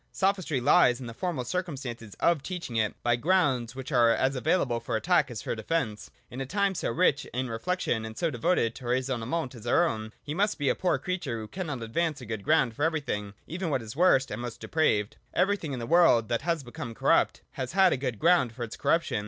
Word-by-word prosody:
Sophistry 190 -7 0
lies 125 0 +4
in 130 - -7
the 115 - -7
formal 160 -1 -3
circumstance 130 - -4
of 170 -4 +3
teaching 170 -8 -6
it 110 -2 +1
by 120 0 +3
grounds 130 -5 +1
which 130 +2 -7
are 120 -3 +5
as 130 +3 +2
available 130 -2 +1
for 115 - -3
attack 150 +4 +2
as 120 -3 -6
for - - -2
defence. 110 -2 -2 0.2
In 130 - -5
a - - -2
time 200 +3 +1
so - - -2
rich 150 +2 +2
in 125 0 -4
reflection 115 -1 -1
and 110 0 -7
so 165 -2 0
devoted 120 -3 +1
to 125 - -11
raisonne 125 -2 -1
ment 160 -5 -2
as 120 -1 -10
our 170 +8 +4
own, 110 -5 -4
he 150 - -4
must 205 +5 +1
be 145 -3 +1
a - - +4
poor 180 - +1
creature 170 -10 -3
who 110 -1 -6
cannot 150 - -5
advance 155 +6 -1
a 125 - -9
good 110 -2 -5
ground 140 -6 +2
for - - -8
everything, 145 -11 -1
even 175 +2 -4
for 155 - -1
what 130 - 0
is 110 +2 -8
worst 145 -6 +4
and 105 +3 -4
most 120 -1 -6
depraved. 110 -10 0 0.2
Everything 195 -6 +1
in 135 - -3
the 120 - -4
world 155 -8 +4
that 115 - 0
has 165 -3 -1
become 120 -1 -7
corrupt - - +2
has 130 +2 -5
had 190 -7 +4
good 125 -4 -2
ground 165 - +3
for 120 - -5
its 110 - -6
corruption. 165 -9 +1
130 Hz, 225 wpm, -28 LUFS, 115-170 Hz, 0.2 s, are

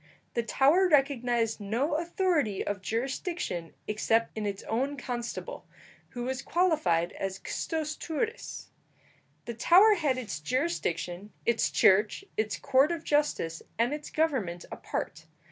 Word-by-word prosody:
The 235 - +1
Tower 285 - +4
recognized 245 -6 +2
no 230 +10 -1
authority 330 - 0
of 205 -1 -3
jurisdiction 230 - -3
except 225 +2 +1
in 215 -1 -2
its 200 -1 -4
own 270 +6 -1
constable, 240 -2 -5 0.4
who 245 - -5
was 260 +1 -2
qualified 305 - +2
as 195 -1 -4
custos 315 -2 -3
turris. 435 +9 -4 0.8
The 235 - -4
Tower 365 - +6
had 300 -9 +1
its 215 - -4
jurisdiction, 205 - -2
its 225 -10 +2
church, 205 - +3
its 215 -1 -1
court 275 +3 +3
of 335 -2 -3
justice, 290 - 0 0.2
and 235 +5 +2
its 300 0 -6
government 245 - -1
apart. 160 +1 -5
245 Hz, 130 wpm, -29 LUFS, 210-305 Hz, 0.8 s, Tower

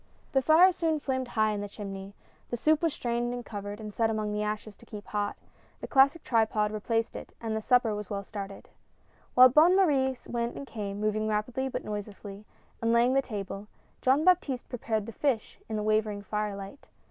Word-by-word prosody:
' - - -33
The 270 - +4
fire 325 +7 +6
soon 325 -3 0
flamed 260 -2 -2
high 215 -2 +1
in 205 -1 -2
the 205 - -5
chimney. 195 -1 -7 0.3
The 240 - -2
soup 310 +5 +3
was 330 -2 +2
strained 240 -1 -2
and 245 - -6
covered, 205 0 -6
and 215 -1 -7
set 225 +1 +1
among 215 -1 -1
the 210 - -1
ashes 210 0 -3
to - - -17
keep 210 -1 -8
hot; 205 -1 -2 0.4
the - - -6
classic 280 +4 +4
tripod 220 -2 +1
replaced 225 +2 -1
it, - - -9
and 225 -1 -3
the 220 - -2
supper 245 -1 +3
was 210 -2 -5
well 200 -1 -3
started. 200 -1 -8 0.7
While 255 +1 +9
Bonne 315 +8 +6
Marie 275 -9 +3
went 235 0 -2
and 280 - -6
came, 205 -5 -5
moving 215 0 0
rapidly 230 +5 -1
but - - -5
noiselessly, 205 -1 -7 0.4
and 230 0 +2
laying 235 +2 +4
the 275 - +4
table, 205 -4 -6 0.3
Jean 270 +5 +3
Baptiste 320 -9 +2
prepared 220 -3 -2
the 230 - -7
fish 245 -2 -1
in 220 - -2
the 210 - -1
wavering 215 -1 0
fire 210 0 -2
light. 200 +7 -10
220 Hz, 205 wpm, -29 LUFS, 210-260 Hz, 0.7 s, While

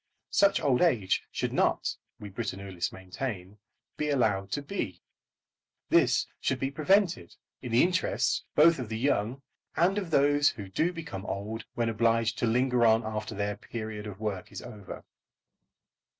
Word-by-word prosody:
Such 200 0 +4
old 130 -4 +2
age 115 - +2
should - - -2
not, - - +1 0.2
we 105 - -7
Britannulists 95 -4 -4
maintain, 95 +1 -6 0.4
be 150 - -1
allowed 105 -8 +1
to 145 - -2
be. 150 - -4 0.9
This - - +4
should 130 - -1
be 135 0 -1
prevented, 180 +5 +2 0.3
in 125 - -6
the 115 - +5
interests 180 +1 +1
both 160 0 +6
of 120 -4 -5
the 110 - -3
young 125 +1 0 0.3
and 190 +5 +3
of 190 -4 -5
those 145 -1 +4
who 100 -4 -8
do 160 - +1
become 160 - -7
old 110 +3 -4
when 120 -1 0
obliged 115 0 +1
to 120 - +1
linger 125 +1 +2
on 110 0 +4
after 110 0 -4
their 100 +1 -1
"period" 110 -2 -6
of 100 -1 -8
work 105 -4 -4
is - - -7
over. 105 -6 -9
115 Hz, 155 wpm, -29 LUFS, 105-145 Hz, 0.9 s, both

